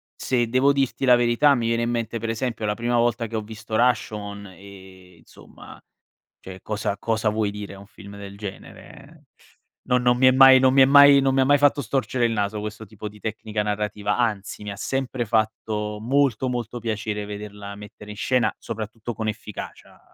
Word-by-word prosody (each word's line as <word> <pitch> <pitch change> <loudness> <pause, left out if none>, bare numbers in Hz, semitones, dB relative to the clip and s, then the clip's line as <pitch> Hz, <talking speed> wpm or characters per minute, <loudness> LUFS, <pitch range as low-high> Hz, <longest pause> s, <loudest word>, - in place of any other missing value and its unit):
se 120 -2 0
devo 130 +4 +3
dirti 135 -1 -1
la 125 -2 +6
verità 120 +4 +3
mi 115 -2 -1
viene 115 0 0
in 115 - -1
mente, 115 -1 -3
per 115 +1 -4
esempio, 115 -1 -3
la 105 - 0
prima 120 +2 -2
volta 120 -1 +1
che 115 - -7
ho 110 - -1
visto 110 0 -7
Rashomon 105 -4 -1
e 95 -2 -15
insomma 80 - -15 0.6
cioè, 95 0 -11
cosa 105 -1 -3
cosa 110 +1 -1
vuoi 105 -1 -1
dire 105 -1 -8
a 100 - -12
un 100 - -13
film 100 0 -13
del 100 0 -10
genere? 100 -2 -11 0.6
Non 125 0 +3
non 125 0 +3
mi 130 - +3
è - - +7
mai 130 0 +8
non 130 0 +4
mi 135 - +6
è - - +8
mai 140 0 +7
non 135 0 +1
mi 135 - +1
ha - - +3
mai 145 +2 +5
fatto 145 0 +3
storcere 130 0 -1
il 115 - 0
naso 105 0 -2
questo 105 +1 -7
tipo 110 +1 -9
di 105 +1 -16
tecnica 110 0 -3
narrativa, 105 0 -2
anzi, 105 -4 -2
mi 105 - -5
ha - - -7
sempre 130 +1 -2
fatto 105 -1 -2
molto, 130 0 +1
molto 120 -1 -4
piacere 110 -2 -3
vederla 105 -1 -8
mettere 105 0 -12
in 105 - -10
scena, 125 +1 +1
soprattutto 110 +1 -6
con 110 0 -4
efficacia, 105 -1 -9
110 Hz, 200 wpm, -23 LUFS, 105-125 Hz, 0.6 s, mai